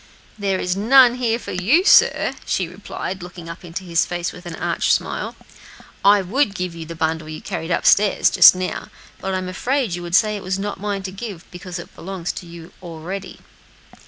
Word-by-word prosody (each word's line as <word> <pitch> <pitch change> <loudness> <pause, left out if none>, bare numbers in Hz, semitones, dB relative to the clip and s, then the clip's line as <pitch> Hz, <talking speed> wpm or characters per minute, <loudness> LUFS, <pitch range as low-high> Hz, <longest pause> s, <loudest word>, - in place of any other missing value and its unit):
"There 195 -2 -1
is 180 0 -1
none 245 +4 +6
here 235 -2 +1
for - - -8
you, 235 - +3
sir," - - +5
she 185 - -1
replied, 190 +1 -6
looking 175 -1 -9
up 165 +2 -9
into 175 +2 -6
his 170 -2 +1
face 175 -1 -3
with 180 0 -11
an 170 - -6
arch - - 0
smile. - - -1 0.7
"I 200 0 +5
would 210 +2 0
give 180 -1 -3
you 165 -1 -8
the 165 - -7
bundle 160 0 -2
you 155 - -6
carried 170 -4 -5
up 170 - 0
stairs, 205 -1 +4
just - - +8
now, 185 0 -4 0.3
but 190 0 -3
I'm 185 0 -3
afraid 245 +3 -1
you 175 - -4
would 175 0 -1
say 215 +1 +4
that - - -11
was 185 +1 -2
not 205 +1 -4
mine 200 -1 -3
to 190 - -5
give, 195 -3 -7
because 180 0 -7
it 175 - -10
belongs 180 -2 -5
to 175 - -9
you 170 0 -12
already." 175 +3 -7
185 Hz, 205 wpm, -21 LUFS, 175-200 Hz, 0.7 s, just